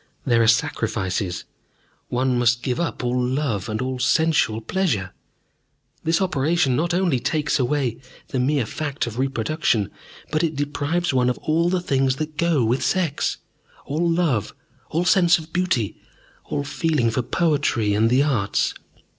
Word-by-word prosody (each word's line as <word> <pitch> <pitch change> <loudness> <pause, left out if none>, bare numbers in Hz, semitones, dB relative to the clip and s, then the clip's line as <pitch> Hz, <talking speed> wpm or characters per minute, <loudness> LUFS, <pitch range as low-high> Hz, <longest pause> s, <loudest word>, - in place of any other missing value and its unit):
There 120 -3 +3
are 115 - +3
sacrifices. 100 -5 0 0.6
One 125 +1 0
must 120 0 +2
give 125 -2 -1
up 170 -6 -2
love 125 -4 -1
and 110 0 -2
all 130 0 -3
sensual 150 -4 +2
pleasure. 115 - -1 0.9
This 165 +1 +2
operation 155 -4 +1
not 165 +5 0
only 175 -7 +1
takes 150 +4 0
away 130 -2 0 0.3
the 130 - -2
mere 135 0 +1
fact 145 +4 -3
of 120 0 -6
reproduction, 130 -4 0 0.4
but 155 0 +1
it 160 -2 0
deprives 145 +4 -1
one 125 -1 +3
of 125 - -1
all 165 +2 +1
the 180 0 0
things 135 -5 +1
that 155 +1 -5
go 160 -7 +2
with 120 +4 +1
sex, 175 -7 0 0.5
all 165 +4 0
love, 165 - 0 0.3
all 170 +3 0
sense 175 -2 +5
of 160 0 -11
beauty, 180 - 0 0.5
all 145 - -2
feeling 145 -5 0
for 130 - 0
poetry 130 - +1
and 110 +2 +3
the 130 +3 +4
arts. 115 -10 0
135 Hz, 150 wpm, -22 LUFS, 120-160 Hz, 0.9 s, sense